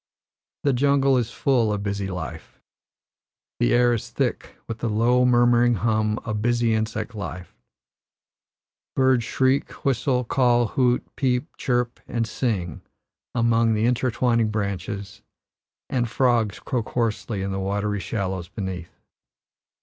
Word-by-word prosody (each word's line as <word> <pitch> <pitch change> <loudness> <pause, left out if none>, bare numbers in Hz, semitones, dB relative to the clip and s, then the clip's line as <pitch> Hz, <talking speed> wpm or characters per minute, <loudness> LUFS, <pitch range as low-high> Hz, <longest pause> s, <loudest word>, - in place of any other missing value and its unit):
The 140 - +3
jungle 135 +1 +3
is 120 -3 +1
full 120 -4 +1
of 105 -1 -2
busy 100 -1 -2
life. 85 -3 -7 1.0
The - - +2
air 120 0 +4
is 115 - -3
thick - - -2
with 115 0 -5
the 115 - -1
low, 120 +4 +3
murmuring 120 -1 +4
hum 110 0 +1
of 105 -2 -2
busy 120 0 +2
insect 110 +1 -2
life, 90 -4 -7 1.4
birds 130 -2 +3
shriek, 130 +3 +1
whistle, 125 -1 +1
call, 120 -2 +2
hoot, 125 -2 +2
peep, 130 +2 -1
chirp, 120 -1 -1
and 115 -1 -1
sing 105 - -2 0.5
among 115 -1 +3
the 110 +1 +1
intertwining 120 -2 +1
branches, 100 -1 -4 0.7
and 120 -3 -1
frogs 115 -5 +1
croak 120 -4 -3
hoarsely 110 -3 -1
in 100 - -2
the 95 - -2
watery 100 +1 -1
shallows 95 -2 -3
beneath. 95 -4 -6
115 Hz, 125 wpm, -24 LUFS, 105-125 Hz, 1.4 s, air